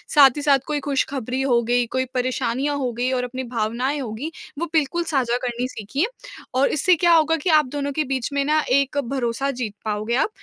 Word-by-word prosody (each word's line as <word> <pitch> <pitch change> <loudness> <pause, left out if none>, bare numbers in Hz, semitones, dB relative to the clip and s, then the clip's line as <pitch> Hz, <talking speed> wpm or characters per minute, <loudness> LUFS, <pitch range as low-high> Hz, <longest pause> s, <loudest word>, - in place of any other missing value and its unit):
साथ 280 -2 +9
ही - - -2
साथ 285 -2 +4
कोई 300 -1 -1
खुशखबरी 270 -2 -2
हो 245 -3 +3
गई, 245 +1 +2
कोई 260 +3 -1
परेशानियाँ 255 +2 -1
हो 255 -3 -1
गई 245 +2 -1
और 255 -1 0
अपनी 255 +1 -4
भावनाएँ 245 +4 -1
होगी, 255 +5 -5 0.3
वो 340 - 0
बिल्कुल 320 +2 +1
साझा 260 -7 0
करनी 245 +1 -2
सीखिए 260 - -2 0.5
और 260 +2 +3
इससे 355 +5 +3
क्या 345 +1 +3
होगा 325 0 +4
कि 355 - 0
आप 305 -2 +5
दोनों 285 -1 -2
के 310 +2 0
बीच 260 -3 -1
में 280 0 +1
ना 305 +1 +3
एक 275 +2 +2
भरोसा 260 0 -1
जीत 245 -5 -4
पाओगे 215 +2 -1
आप 270 - +2
265 Hz, 205 wpm, -22 LUFS, 245-290 Hz, 0.5 s, साथ